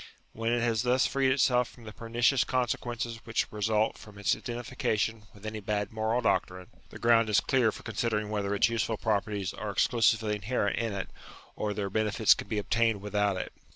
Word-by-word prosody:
When 115 +1 -1
it 120 0 +1
has 115 -2 +1
thus 125 +1 +2
freed 135 -1 +2
itself 125 -2 +3
from 120 - -16
the 110 -1 -9
pernicious 120 +3 +2
consequences 120 -1 -2
which 115 -1 0
result 110 +1 0
from 105 -1 -13
its 100 - +1
identification 115 -2 -2
with 105 +1 -15
any 110 0 -4
bad 105 0 -2
moral 110 +2 0
doctrine, 95 -4 -1 0.2
the - - -10
ground 115 -1 +4
is 105 - +4
clear 125 -5 +2
for - - -11
considering 105 -1 -2
whether 100 -1 -1
its - - +4
useful 115 -1 -1
properties 100 -3 -1
are 105 +1 -5
exclusively 110 0 +2
inherent 105 0 -1
in 115 -3 -1
it, 95 -1 -5 0.4
or 105 -1 -2
their 100 -2 -3
benefits 110 0 +4
can - - -7
be 110 - -2
obtained 115 +1 +1
without 105 -1 0
it. - - -5
110 Hz, 190 wpm, -29 LUFS, 105-115 Hz, 0.4 s, ground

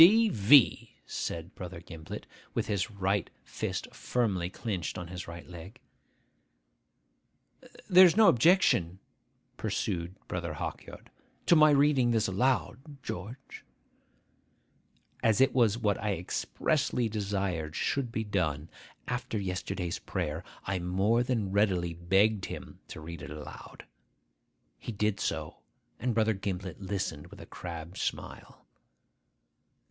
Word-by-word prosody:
'D.V.!' 165 - +6
said 85 +2 -4
Brother 90 -1 -7
Gimblet, 80 -2 -8 0.3
with - - 0
his 100 -1 -1
right 100 -2 -1
fist - - -4
firmly 100 -8 -1
clinched 95 -4 -4
on 90 -1 -6
his 90 0 -6
right 85 0 -9
leg. 90 +3 -10 2.1
'There 185 0 +9
is 175 - +1
no 220 -2 +7
objection,' 120 - +4 0.6
pursued 85 +1 -2
Brother - - -3
Hawkyard, - - -7 0.3
'to 175 - +6
my 155 -1 +7
reading 140 -3 +4
this 110 -2 +2
aloud, 130 - 0
George?' 115 +9 -7 1.6
As 110 -3 +3
it 135 - +5
was 115 -4 +3
what 105 -4 0
I 105 -2 0
expressly 120 - 0
desired 95 -7 -2
should 135 -4 -1
be 110 - -2
done, 85 -7 -1 0.4
after 125 -3 -2
yesterday's 90 -2 -3
prayer, 85 -3 -3 0.2
I 95 -1 -1
more 95 +7 +2
than 115 -6 -1
readily 95 -4 +2
begged 95 +4 +2
him - - -8
to - - -8
read 80 0 -8
it - - -7
aloud. 75 -1 -10 0.9
He - - -6
did 105 -1 0
so; - - -3 0.4
and 120 -2 -1
Brother 110 -1 +3
Gimblet 95 -2 -5
listened 95 -7 -3
with - - -13
a - - -9
crabbed 85 0 -7
smile. - - -5
100 Hz, 120 wpm, -30 LUFS, 90-120 Hz, 2.1 s, There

